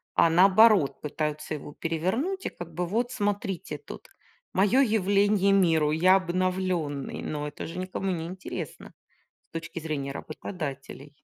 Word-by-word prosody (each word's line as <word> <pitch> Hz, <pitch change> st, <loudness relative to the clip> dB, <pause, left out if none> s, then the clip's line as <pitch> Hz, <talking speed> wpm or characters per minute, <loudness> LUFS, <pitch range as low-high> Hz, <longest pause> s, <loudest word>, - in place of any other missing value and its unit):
а 170 Hz, -, +5 dB
наоборот 190 Hz, -4 st, +5 dB
пытаются 150 Hz, +1 st, -3 dB
его 145 Hz, 0 st, -7 dB
перевернуть 190 Hz, -, -2 dB
и -, -, 0 dB
как 175 Hz, -1 st, -10 dB
бы 180 Hz, 0 st, -1 dB
вот 235 Hz, +7 st, -1 dB
смотрите 205 Hz, -4 st, -2 dB
тут, -, -, -11 dB, 0.4 s
мое 210 Hz, +8 st, +4 dB
явление 200 Hz, -3 st, +3 dB
миру, 160 Hz, -6 st, +3 dB
я 185 Hz, +4 st, +5 dB
обновленный, 180 Hz, -5 st, -1 dB
но 150 Hz, -1 st, -3 dB
это 145 Hz, -, -7 dB
же 165 Hz, -, -7 dB
никому 185 Hz, +1 st, -3 dB
не 165 Hz, -2 st, -3 dB
интересно 185 Hz, +1 st, -7 dB, 0.6 s
с -, -, -83 dB
точки 165 Hz, +1 st, -5 dB
зрения 150 Hz, -4 st, -3 dB
работодателей. 145 Hz, -2 st, -7 dB
180 Hz, 140 wpm, -27 LUFS, 155-195 Hz, 0.6 s, а